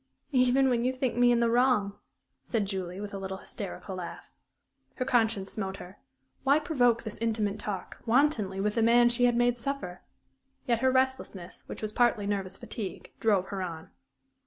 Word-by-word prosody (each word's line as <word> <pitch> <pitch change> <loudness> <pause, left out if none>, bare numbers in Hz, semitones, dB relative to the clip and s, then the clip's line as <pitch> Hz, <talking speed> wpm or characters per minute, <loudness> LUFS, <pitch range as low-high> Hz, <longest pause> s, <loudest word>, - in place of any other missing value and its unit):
"Even 260 0 +4
when 240 -2 +1
you 255 - +2
think 255 -2 -1
me 245 0 +5
in 235 -1 +3
the 235 - +3
wrong?" 240 -5 +3 0.5
said 210 - -1
Julie, 190 -2 -4
with 205 0 -6
a 195 - -4
little, 190 0 -5
hysterical 195 -1 -6
laugh. 175 -2 -8 0.6
Her 255 - -2
conscience 225 -6 +1
smote 195 -2 -4
her. 185 +3 -11 0.4
Why 280 +2 +5
provoke 245 -7 +2
this 215 -2 -7
intimate 215 -2 -1
talk 205 -3 -6
wantonly 225 -6 +2
with 210 +1 0
the 230 - +1
man 240 +1 +5
she 245 +1 +2
had 240 -1 +3
made 240 0 +2
suffer? 275 -9 -4 0.6
Yet 235 -2 +1
her 260 +2 +3
restlessness, 260 -8 -1
which - - -8
was 215 - -2
partly 235 -3 +2
nervous 195 -2 -1
fatigue, 205 -5 -7
drove 200 -4 +2
her 195 -2 -3
on. 165 -3 -6
225 Hz, 180 wpm, -29 LUFS, 195-245 Hz, 0.6 s, me